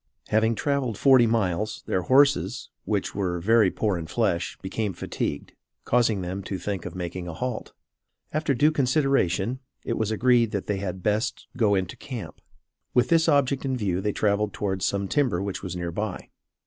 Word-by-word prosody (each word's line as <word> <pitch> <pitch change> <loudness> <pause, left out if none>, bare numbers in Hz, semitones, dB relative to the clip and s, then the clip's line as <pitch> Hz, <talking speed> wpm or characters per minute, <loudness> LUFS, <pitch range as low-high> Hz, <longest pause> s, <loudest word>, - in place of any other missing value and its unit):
Having 110 +1 +3
traveled 135 -5 -1
forty 130 -4 +6
miles, 110 -1 -1
their 90 - 0
horses, 130 -3 +3
which 105 -3 -1
were 90 -3 -1
very 110 +2 +4
poor 100 -2 -1
in 80 - -6
flesh, 85 +2 -1
became 100 +1 -3
fatigued, - - -4 0.3
causing 115 -5 +2
them 90 +2 -4
to 95 0 -4
think 95 0 -4
of - - -9
making 90 0 -5
a 85 - -6
halt. 125 +3 -4 0.6
After 155 -2 0
due 150 +5 +4
consultation, 130 - +1 0.3
it 115 - -2
was 110 -2 0
agreed 120 +1 +3
that 100 - -2
they 105 - -1
had 95 -2 -5
best 105 +5 0
go 110 -5 +3
into 95 -2 -2
camp. 125 -6 -7 0.5
With 125 - +3
this 165 -1 +4
object 140 -2 +2
in 130 -2 -1
view 95 -5 -1
they 105 - 0
traveled 105 0 0
towards 95 -2 -1
some 100 -1 -1
timber 125 -7 +1
which 100 0 -3
was 90 -2 -5
near 85 -1 -3
by. 105 +1 -4
105 Hz, 175 wpm, -25 LUFS, 95-125 Hz, 0.6 s, forty